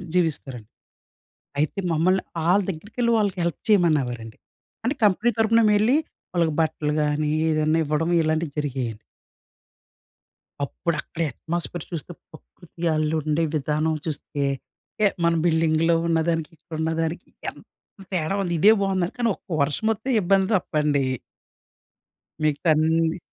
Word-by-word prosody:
జీవిస్తారండి. 140 -10 -1 0.9
అయితే 155 +6 0
మమ్మల్ని 180 +4 +2 0.2
ఆళ్ళ 195 +3 +5
దగ్గరికెళ్ళి 215 +7 -2
ఆళ్ళకి 195 -3 -1
హెల్ప్ 170 -3 -1
చేయమనేవారండి. 135 - +2 0.5
అంటే 255 +6 0
కంపెనీ 210 +3 +4
తరుపున 225 +1 +4
మేం - - +4
వెళ్ళి 235 +8 +4 0.4
వాళ్ళకి 170 -3 +2
బట్టలు 150 -1 -1
కాని 150 0 0 0.2
ఏదైనా 155 +1 +2
ఇవ్వడం 155 +3 0
ఇలాంటివి 155 0 0
జరిగాయండి. 125 -7 -2 1.6
అప్పుడు 170 +3 -2
అక్కడ 165 - -7
అట్మాస్ఫియర్ 170 +4 -4
చూస్తే 170 +1 -5 0.2
ప్రకృతి 170 +1 -8
ఆళ్ళు 155 0 0
ఉండే 155 +2 0
విధానం 155 +2 0
చూస్తే 145 -2 -3 0.8
మన 170 - +4
బిల్డింగ్‌లో 165 0 +3
ఉన్నదానికి 165 -1 +1
అక్కడ 165 0 -10
ఉన్నదానికి 165 +2 -2 0.2
ఎంత - - -14 0.5
తేడా 175 +2 0
ఉంది. 175 -3 -1
ఇదే 205 +6 +7
బాగుందండి 190 -2 0
కానీ 240 -2 +1
ఒక్క - - -34
వర్షం 145 +9 0
మొత్తం 225 +5 -2
ఇబ్బంది 190 +1 +3
తప్ప 185 - -2
అండి... 145 -2 +2 1.4
మిగతా 155 +2 +1
అన్ని 160 +2 +2
165 Hz, 125 wpm, -24 LUFS, 155-185 Hz, 1.6 s, ఇదే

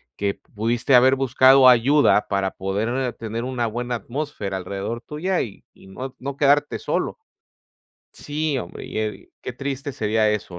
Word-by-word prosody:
que 100 0 -1
pudiste 115 +5 0
haber 130 +2 +6
buscado 130 0 +6
ayuda 125 -1 +4
para 100 -1 0
poder 115 +7 -2
tener 115 +1 -5
una 125 -3 -1
buena 120 +2 -3
atmósfera 120 -5 -4
alrededor 100 +5 -5
tuya 175 +5 -2
y 105 -6 -10
y - - -18
no 130 +7 -7
no 140 +1 -6
quedarte 145 0 +2
solo. - - -2 0.9
Sí, 150 -1 -3
hombre 85 - -8
y, - - -5
eh, 110 -1 -4
qué - - -5
triste 140 +2 -4
sería 110 -1 +1
eso, 100 -4 -4
120 Hz, 155 wpm, -22 LUFS, 105-135 Hz, 0.9 s, haber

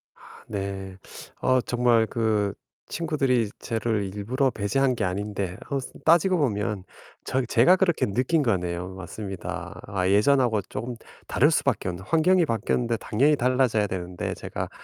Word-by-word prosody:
아 - - -26 0.3
네. 95 -2 -5 0.4
어 130 0 +3
정말 120 -2 +2
그 110 -4 0 0.4
친구들이 135 -9 0
저를 110 -4 -2
일부러 130 +6 0
배제한 130 +5 0
게 110 - -2
아닌데 100 -1 -3
어 140 - 0 0.3
따지고 175 +3 +5
보면 105 - -1 0.4
저 130 - 0
제가 120 +10 +5
그렇게 185 -3 +2
느낀 130 +10 +1
거네요. 90 -6 -1
맞습니다. 95 +1 -6
아 95 -2 -1
예전하고 110 +2 +3
쪼금 120 +1 -5 0.3
다를 - - +3
수 - - +1
밖에 - - 0
없는 90 +2 -7
환경이 170 +2 +3
바뀌었는데 115 -1 0
당연히 135 +8 +2
달라져야 125 -5 +2
되는데 90 -1 -4
제가 - - -5
115 Hz, 310 characters per minute, -25 LUFS, 100-130 Hz, 0.4 s, 따지고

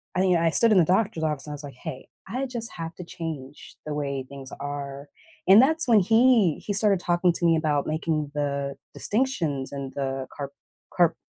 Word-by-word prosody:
I 185 - +2 0.2
I - - +5
stood 230 +6 +3
in - - +5
the 175 - +7
doctor's 185 -3 +1
office, 150 -3 -1
and - - -5
I - - -4
was 145 - -9
like, 140 -1 -8
"Hey, 130 +1 -8 0.2
I 260 +3 -2
just 235 -3 -5
have 165 0 -6
to 180 - -8
change 150 -5 -7
the 150 - -3
way 140 -2 -3
things 135 -1 -9
are," 140 0 -5 0.4
and 200 +5 +9
that's 320 +2 +3
when 225 -3 +6
he 225 - +4
he 205 - -1
started 200 -2 +3
talking 175 0 +2
to 170 - -2
me 165 -1 +5
about 150 -3 0
making 155 -2 -1
the 140 -1 -2 0.2
distinctions, 170 - -1
and 140 -1 -6
the 135 -1 -3
car 140 -1 -5 0.4
car 175 -2 +4
160 Hz, 200 wpm, -25 LUFS, 140-195 Hz, 0.4 s, and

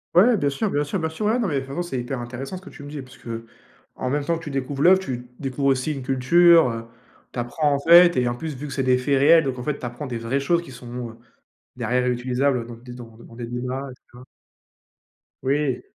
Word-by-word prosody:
Ouais, 220 +6 +6
bien 145 -6 +1
sûr 170 +10 -1
bien 145 - +1
sûr 150 +6 -3
bien 160 -1 -1
sûr, 160 +7 -4
ouais, 225 +3 +2
non 235 -4 0
mais 140 -5 0
façon, 135 +5 -4
c'est 170 -7 -3
hyper 120 +2 -4
intéressant 125 +7 -6
ce - - -11
que 190 - -12
tu - - -13
me 145 - -8
dis, 145 -1 -6
parce 130 0 -14
que, 120 - -12
heu, 115 0 -5 0.5
en 130 - -3
même 145 +2 0
temps 170 +2 0
que - - -13
tu - - -5
découvres 135 0 -3
l'oeuvre, 185 +4 +6
tu 125 -9 -6
découvres 140 0 -2
aussi 135 +2 +1
une 135 - -6
culture, 150 +5 +5
heu, 115 0 -6 0.5
tu - - -4
apprends 145 +5 0
en - - -1
fait 170 +3 +7
et 125 -1 +2
en 120 - 0
plus 155 +3 -5
vu 145 +3 -6
que 140 - -6
c'est 135 - -1
des 130 -1 +3
faits 135 +2 +1
réels, 160 +4 +6
donc 130 -3 -3
en - - -5
fait 150 +1 -2
tu - - -7
apprends 120 +4 -6
des 120 -2 -4
vraies 115 +4 -1
choses 170 +5 +1
qui 150 - -12
sont, 125 -1 -7
heu, - - -15 0.6
derrière 125 0 0
ré-utilisables 125 0 0
dans 120 - -8
des 125 +1 -12
dans 115 -2 -11
des 115 - -14
dans 115 - -14
des 120 -1 -5
débats, 125 +3 -4
tu - - -40
vois? 125 - -12 1.2
Oui. 135 -1 0
135 Hz, 265 wpm, -23 LUFS, 125-150 Hz, 1.2 s, fait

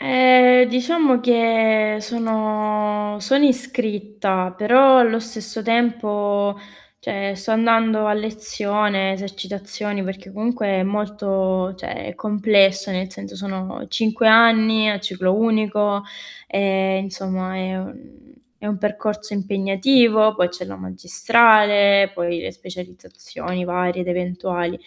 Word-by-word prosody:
Ehm, 255 -1 +5
diciamo 255 +1 +1
che 225 -3 +2
sono 215 -2 -2
sono 270 +8 +2
iscritta, 210 -8 -1
però 260 +5 +6
allo 230 -2 +3
stesso 220 -1 -8
tempo, 210 -4 0 0.4
cioè, 195 0 -4
sto 195 +3 -7
andando 225 -1 +2
a 210 - +1
lezione, 210 -2 -2
esercitazioni 200 +1 -6
perché 195 0 -9
comunque 220 +2 -3
è 190 -1 0
molto, 195 -2 -2
cioè 185 - -8
è - - -8
complesso 200 -2 +1
nel 185 0 -4
senso, 100 - -11
sono 190 -1 -7
5 225 0 +1
anni 220 -1 +5
a 205 - -2
ciclo 185 -2 -1
unico, 210 -2 0 0.4
e 190 -1 0
insomma, 190 -1 -5
è 185 0 -4
un 270 +6 -12 0.3
è - - -8
un 210 -1 -2
percorso 210 +1 -4
impegnativo, 215 +3 +2
poi 180 -4 +1
c'è 180 +1 -8
la 100 - -9
magistrale, 200 - +3
poi 175 -2 -3
le - - -6
specializzazioni 180 0 -9
varie 180 0 -2
ed 180 - -7
eventuali, 180 -1 -3
210 Hz, 120 wpm, -20 LUFS, 190-225 Hz, 0.4 s, però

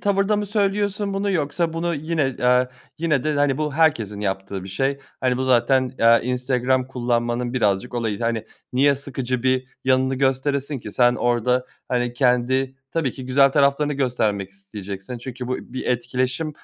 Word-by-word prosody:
tavırda 200 +1 +2
mı 205 0 -2
söylüyorsun 205 0 0
bunu 200 +1 0
yoksa 165 0 0
bunu 170 +1 -1
yine, 150 -3 -1
eee, 125 0 +3 0.3
yine 155 -4 +1
de 155 -1 +1
bu, - - 0
hani, 140 -1 +2
bu 150 -2 -2
herkesin 115 -11 +2
yaptığı 95 -1 -3
bir 95 - -8
şey, 135 +8 -1 0.2
hani, 125 -1 +1
bu 130 - -1
zaten, 130 +1 +3
eee, 115 0 +6
Instagram 125 +1 0
kullanmanın 120 -1 -1
birazcık 105 0 0
olayı, 115 -3 -2
hani, 115 -1 -1 0.3
niye 140 +2 +4
sıkıcı 130 -3 -4
bir 130 0 +1 0.2
yanını 130 0 +2
gösteresin 135 +1 0
ki 105 - -9
sen 120 +1 +4
orda, 125 +1 +1 0.2
hani, 125 -1 0
kendi 130 +1 +1
tabii 155 -7 -1
ki 130 -2 -8
güzel 135 +1 +4
taraflarını 145 +1 +3
göstermek 110 -8 -1
isteyeceksin 100 +3 -8
çünkü 125 0 -7
bu 130 - 0
bir 130 +1 -7
etkileşim, 125 +4 -1
130 Hz, 165 wpm, -22 LUFS, 120-140 Hz, 0.3 s, eee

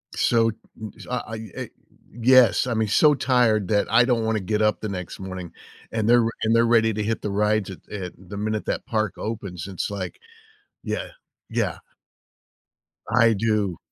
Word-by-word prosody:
So 115 -1 +3 0.3
n 110 - -6 0.2
I 120 -3 -3
e 110 -3 -9
eh - - -5 0.4
yes. 125 0 +4
I 120 - 0
mean, 110 -1 0
so 150 +8 +5
tired 120 -7 +2
that 105 +2 +1
I 120 +2 +6
don't 120 -2 +1
wanna 110 -1 +1
get 105 +3 -1
up 105 0 +2
the 110 - -3
next 90 -3 -6
morning, 95 -2 -7 0.4
and 110 -1 -1
they're 120 0 +6 0.2
and 110 +1 +3
they're 115 0 +5
ready 115 -1 +3
to 105 +1 -2
hit 110 +1 -2
the 105 - -3
rides 105 0 +1
at 95 - -8
at 95 -4 -5
the 95 +2 -10
minute 110 +1 -2
that - - -2
park 110 -3 -1
opens. 100 -5 -5
It's 95 -3 -3
like 100 -2 -5 0.6
yeah. - - -3 0.4
Yeah. - - -1 1.3
I 115 -2 +4
do. 105 -4 0
110 Hz, 175 wpm, -24 LUFS, 100-115 Hz, 1.3 s, I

